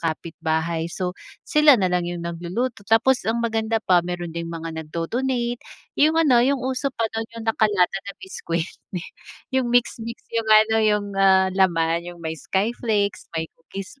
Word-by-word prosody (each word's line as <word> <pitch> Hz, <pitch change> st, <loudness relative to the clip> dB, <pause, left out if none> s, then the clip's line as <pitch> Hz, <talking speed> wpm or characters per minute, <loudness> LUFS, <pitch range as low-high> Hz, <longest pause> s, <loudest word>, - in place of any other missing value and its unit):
kapitbahay. 160 Hz, 0 st, -2 dB
So, 180 Hz, +1 st, -3 dB, 0.3 s
sila 300 Hz, -2 st, +6 dB
nalang 180 Hz, -4 st, 0 dB
yung 175 Hz, -1 st, -5 dB
nagluluto, 175 Hz, +9 st, -3 dB
tapos 245 Hz, +3 st, +4 dB
ang 225 Hz, -, +1 dB
maganda 225 Hz, 0 st, 0 dB
pa 185 Hz, -5 st, +3 dB
meron 175 Hz, -1 st, -5 dB
ding 170 Hz, 0 st, -4 dB
mga 165 Hz, 0 st, -5 dB
nagdo-donate, 235 Hz, +11 st, -2 dB, 0.4 s
yung 310 Hz, +2 st, +5 dB
ano, 285 Hz, -7 st, +5 dB
yung 270 Hz, +3 st, +3 dB
uso 260 Hz, +1 st, -1 dB
pa 230 Hz, -, 0 dB
dun 225 Hz, 0 st, -3 dB
yung 230 Hz, -, -6 dB
nakalata 210 Hz, -4 st, +2 dB, 0.2 s
na -, -, -4 dB
biscuit, 170 Hz, -, -4 dB, 0.9 s
yung 260 Hz, -2 st, +1 dB
mix-mix, 235 Hz, -1 st, 0 dB, 0.2 s
yung 230 Hz, -1 st, -1 dB
ano, 215 Hz, +1 st, +6 dB
yung, 210 Hz, -1 st, +2 dB
ah, 190 Hz, -1 st, +4 dB
laman, 170 Hz, -2 st, +1 dB
yung 175 Hz, -, -9 dB
may 160 Hz, -, -2 dB
skyflakes, 205 Hz, -, -1 dB
may 160 Hz, 0 st, -2 dB
cookies, 195 Hz, +9 st, -10 dB
200 Hz, 155 wpm, -23 LUFS, 170-235 Hz, 0.9 s, sila